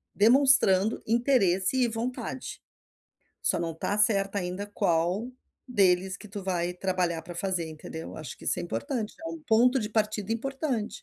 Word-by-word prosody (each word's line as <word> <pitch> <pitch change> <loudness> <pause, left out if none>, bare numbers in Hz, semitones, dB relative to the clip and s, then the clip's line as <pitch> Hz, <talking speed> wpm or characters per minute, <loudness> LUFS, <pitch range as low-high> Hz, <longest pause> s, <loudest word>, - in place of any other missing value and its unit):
demonstrando 225 -3 +5
interesse 230 -4 +2
e 250 -2 +3
vontade. 250 +3 -5 0.8
Só - - +2
não 165 -1 -2
está 200 +6 -2
certa 200 -1 +3
ainda 180 +3 -4
qual 180 +4 0 0.4
deles 190 -4 +2
que 210 - -12
tu 200 -1 -7
vai 180 -1 -1
trabalhar 180 -3 -1
para 175 - -9
fazer, 180 -2 -1
entendeu? 160 +1 -8
Acho 155 -5 -7
que - - -13
isso - - +1
é - - -4
importante, 230 - -3
é 330 - -5
um 330 -1 -7
ponto 245 +4 +4
de 210 0 -4
partida 215 -1 -1
importante. 265 -2 -2
205 Hz, 160 wpm, -27 LUFS, 180-235 Hz, 0.8 s, demonstrando